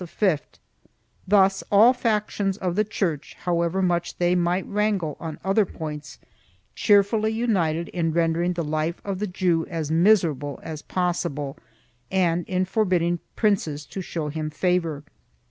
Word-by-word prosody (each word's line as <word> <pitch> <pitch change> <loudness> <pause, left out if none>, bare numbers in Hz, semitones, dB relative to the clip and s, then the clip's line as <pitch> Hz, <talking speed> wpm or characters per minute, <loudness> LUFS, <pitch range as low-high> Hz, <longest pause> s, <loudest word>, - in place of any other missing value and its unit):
3 180 -1 +1 0.9
Thus 195 -1 +4
all 220 +5 +7
factions 210 -5 -1
of 180 -4 -2
the 210 - +3
Church, 180 -8 -3
however 175 +1 0
much 175 -1 0
they 175 0 +2
might 180 +1 +1
wrangle 200 -6 0
on 160 -2 -6
other 195 +3 +3
points, 150 -5 -7 0.6
cheerfully 210 +1 +3
united 180 -8 0
in 165 -2 -1
rendering 170 +2 +1
the 170 -1 -2
life 155 +2 -2
of 195 -2 -3
the 210 - -1
Jew 175 -3 0
as 160 -3 -3
miserable 165 -6 +2
as 155 -2 -6
possible 170 -6 -2 0.5
and 175 -2 +1
in 185 0 +1
forbidding 180 -4 +1 0.2
princes 160 -9 0
to 190 - -6
show 165 -4 -4
him 155 +1 -3
favor. 165 -2 0
175 Hz, 140 wpm, -24 LUFS, 160-195 Hz, 0.9 s, all